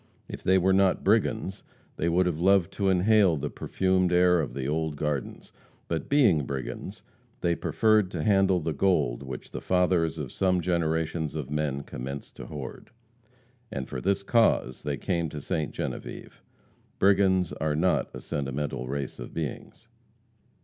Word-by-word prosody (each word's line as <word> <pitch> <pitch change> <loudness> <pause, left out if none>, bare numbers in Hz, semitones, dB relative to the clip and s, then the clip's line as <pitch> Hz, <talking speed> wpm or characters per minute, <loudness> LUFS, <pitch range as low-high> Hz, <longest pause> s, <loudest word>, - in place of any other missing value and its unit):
If - - -8
they 95 +1 +4
were 95 +1 +3
not 95 -1 +3
brigands, 105 -1 +1 0.3
they 85 - 0
would 90 +2 +3
have 85 -3 -1
loved 95 -1 +3
to 100 -2 0
inhale 95 -2 +4
the 75 +1 -4
perfumed 95 -1 0
air 90 0 +4
of 75 - -5
the 65 -1 -3
old 80 0 -1
gardens. 75 -3 -4 0.3
But 80 -1 -3
being 110 - +4
brigands, 70 - -5 0.4
they 85 -1 +2
preferred 110 +2 +2
to 85 -4 -4
handle 95 -3 +3
the 80 -1 -2
gold 70 -7 +1
which 65 -2 -8
the - - -6
fathers 90 -3 +1
of 75 -5 -5
some 90 -1 +1
generations 80 -2 -1
of 75 -3 -5
men 75 -2 -1
commenced 70 +3 -7
to - - -8
hoard. 70 -4 -8 0.8
And 65 -10 -4
for 65 - -5
this 100 +1 0
cause 110 - +2
they 70 -1 -3
came 85 -4 -1
to 75 - -6
Ste. 75 +1 -2
Genevieve. - - -6 0.6
Brigands 95 -3 +3
are 75 -1 -1
not 90 +4 +1
a - - -8
sentimental 70 -2 -3
race 70 0 -4
of - - -8
beings. - - -6
85 Hz, 160 wpm, -27 LUFS, 75-95 Hz, 0.8 s, they